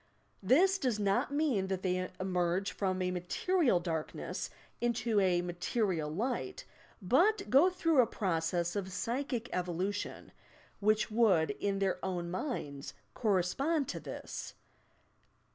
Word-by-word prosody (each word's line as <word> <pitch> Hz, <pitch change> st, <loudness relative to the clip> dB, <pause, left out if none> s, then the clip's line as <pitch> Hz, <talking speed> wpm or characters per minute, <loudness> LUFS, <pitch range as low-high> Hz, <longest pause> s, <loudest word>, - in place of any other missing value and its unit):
This 350 Hz, -, +4 dB
does 250 Hz, -5 st, 0 dB
not 205 Hz, +7 st, +1 dB
mean 285 Hz, -10 st, +1 dB
that 190 Hz, -1 st, -3 dB
they 185 Hz, -1 st, 0 dB
emerge 185 Hz, +1 st, 0 dB
from 185 Hz, -2 st, -1 dB
a 180 Hz, -, 0 dB
material 195 Hz, -, +1 dB
dark 165 Hz, -3 st, -3 dB
ness -, -, -4 dB, 0.3 s
into 235 Hz, -2 st, +1 dB
a 180 Hz, -2 st, +2 dB
material 175 Hz, -2 st, -1 dB
light, 245 Hz, -, -3 dB, 0.4 s
but 390 Hz, -, +3 dB
go 285 Hz, +8 st, +7 dB
through 330 Hz, -6 st, +3 dB
a 235 Hz, -, +2 dB
process 170 Hz, -3 st, -1 dB
of 190 Hz, -2 st, -3 dB
psychic 245 Hz, +4 st, -2 dB
evolution, 180 Hz, +3 st, -3 dB, 0.5 s
which 215 Hz, +1 st, +2 dB
would, 210 Hz, -8 st, +4 dB
in 200 Hz, -1 st, -2 dB
their 195 Hz, -1 st, -1 dB
own 175 Hz, -2 st, -2 dB
minds, 155 Hz, -, -4 dB, 0.2 s
correspond 250 Hz, -, +1 dB
to -, -, -3 dB
this. -, -, -7 dB
200 Hz, 125 wpm, -32 LUFS, 180-250 Hz, 0.5 s, go